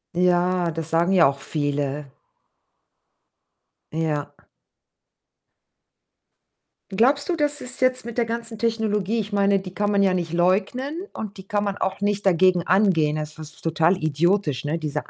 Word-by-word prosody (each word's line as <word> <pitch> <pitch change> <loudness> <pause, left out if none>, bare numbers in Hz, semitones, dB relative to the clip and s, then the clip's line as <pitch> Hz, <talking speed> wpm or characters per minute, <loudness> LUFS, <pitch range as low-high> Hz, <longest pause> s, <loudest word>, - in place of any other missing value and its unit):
Ja, 180 -1 +2
das 165 0 -4
sagen 170 +3 +2
ja 175 -3 +6
auch 140 0 -2
viele. 145 -1 -2 1.8
Ja. 155 -2 -2 2.6
Glaubst 275 - +2
du, 340 - 0
das 295 -1 0
ist 250 +1 -2
jetzt 255 -1 +2
mit 235 0 -7
der 235 - +2
ganzen 230 -1 -5
Technologie 220 -2 0
ich 210 0 -4
meine, 200 -1 +2
die 185 -1 -9
kann 205 +1 0
man 200 -1 +3
ja 190 -1 +3
nicht 170 -2 -2
leugnen 220 - 0
und 210 -1 -7
die 190 - -11
kann 205 0 0
man 200 -1 -2
auch 190 +1 -2
nicht 205 0 0
dagegen 180 -1 +3
angehen. 180 -6 +3
Das 155 0 -5
ist 155 0 -10
total 165 +2 +2
idiotisch, 155 -2 0
ne, 155 +3 -1
diese 155 -3 -4
185 Hz, 150 wpm, -23 LUFS, 160-210 Hz, 2.6 s, ja